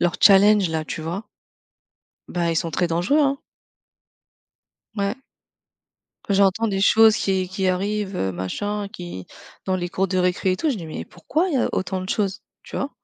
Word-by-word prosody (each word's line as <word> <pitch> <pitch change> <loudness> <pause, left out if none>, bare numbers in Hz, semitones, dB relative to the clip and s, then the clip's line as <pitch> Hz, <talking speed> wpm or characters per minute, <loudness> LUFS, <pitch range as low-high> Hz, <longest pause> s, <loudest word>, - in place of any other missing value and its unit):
leurs 175 0 +1
challenges, 200 -1 +6
là, 160 -1 -2
tu 155 - -5
vois? 175 +7 -5 1.0
Bah, 170 -1 -1
ils 165 - -1
sont 165 +1 -1
très 175 +3 0
dangereux, 175 - +1
hein. 275 -1 +1 1.6
Ouais. 200 +1 0 1.1
J'entends 200 +3 +3
des 195 -1 -1
choses 220 +1 +6
qui 190 -2 0
qui 190 0 -2
arrivent, 200 +2 -1
heu, 95 - -1
machin, 200 - -3
qui 175 - -8 0.4
dans 185 - 0
les 175 -1 -2
cours 195 +2 0
de 185 0 -1
récré 180 +1 +1
et 185 - -1
tout. 310 - -1
Je 255 - -1
dis: 170 -5 -7
«Mais 155 - -6
pourquoi 315 - -2
il 310 - -2
y - - +3
a - - +1
autant 190 0 -2
de 185 - -7
choses»? 195 -3 -1 0.2
Tu - - -8
vois? 280 - -2
190 Hz, 185 wpm, -22 LUFS, 175-210 Hz, 1.6 s, challenges